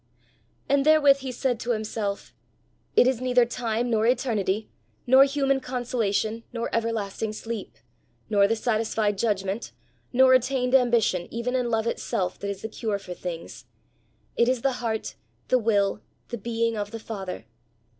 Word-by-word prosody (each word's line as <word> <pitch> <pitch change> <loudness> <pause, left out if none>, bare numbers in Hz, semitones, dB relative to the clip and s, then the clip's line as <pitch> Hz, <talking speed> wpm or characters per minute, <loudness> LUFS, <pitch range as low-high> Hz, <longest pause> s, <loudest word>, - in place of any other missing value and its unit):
And 280 0 +3
therewith 290 -2 +6
he 265 -1 -5
said 245 -1 -1
to 240 +1 -1
himself: 215 -2 -4 0.6
"It - - +6
is 255 -1 +1
neither 250 -1 +4
time, 235 0 -2
nor 220 0 +2
eternity, 220 -5 0 0.4
nor 260 +2 +7
human 275 -1 +1
consolation, 230 -3 -1
nor 235 -1 -4
everlasting 220 -2 -2
sleep, 225 0 -6 0.5
nor 200 -2 +4
the 225 - +1
satisfied 220 -2 0
judgment, 200 -1 -1 0.4
nor 260 +1 +6
attained 255 0 +2
ambition, 235 -8 +3
even 235 +2 -2
in 250 -2 0
love 225 -1 0
itself, 185 -5 -2
that 200 - -4
is 200 -1 -5
the - - -2
cure 215 -1 -3
for 185 -2 -8
things; 175 -2 -7 0.7
it 235 +1 +3
is 255 -2 0
the 270 -2 +1
heart, 220 -2 -2 0.4
the 255 - +4
will, 205 -3 +1 0.3
the 235 - -4
being 230 +1 -1
of 205 -1 -3
the 225 - -6
Father. 195 - -6
230 Hz, 155 wpm, -26 LUFS, 210-250 Hz, 0.7 s, nor